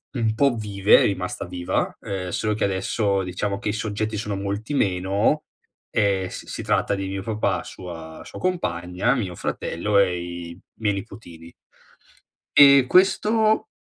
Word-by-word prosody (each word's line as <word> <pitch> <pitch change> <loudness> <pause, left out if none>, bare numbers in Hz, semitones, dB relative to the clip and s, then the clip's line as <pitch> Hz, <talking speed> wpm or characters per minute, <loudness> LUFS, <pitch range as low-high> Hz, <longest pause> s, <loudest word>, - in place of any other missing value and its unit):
un 110 -3 0
po' 140 +2 +3
vive, 100 -2 +4
è - - +4
rimasta 95 0 -2
viva, 90 0 -2
ehm, 95 -2 -4
solo 105 +4 -1
che - - 0
adesso 100 +1 0
diciamo 100 +2 -2
che 105 - -3
i - - 0
soggetti 110 0 -2
sono 105 -1 -3
molti 100 +6 -4
meno, 100 +5 +1 0.4
e 100 -3 +1
s - - -8
si - - -5
tratta - - +1
di 95 -1 -4
mio 95 0 -4
papà, 110 0 -1
sua 80 -3 -9
sua - - -9
compagna, 120 - 0
mio 95 -9 -3
fratello 100 +6 -1
e 90 -3 +2
i 85 0 -7 0.2
miei 105 -3 +1
nipotini. 85 -4 -10 1.0
E 140 -2 +9
questo 215 - +3
100 Hz, 150 wpm, -23 LUFS, 90-110 Hz, 1.0 s, E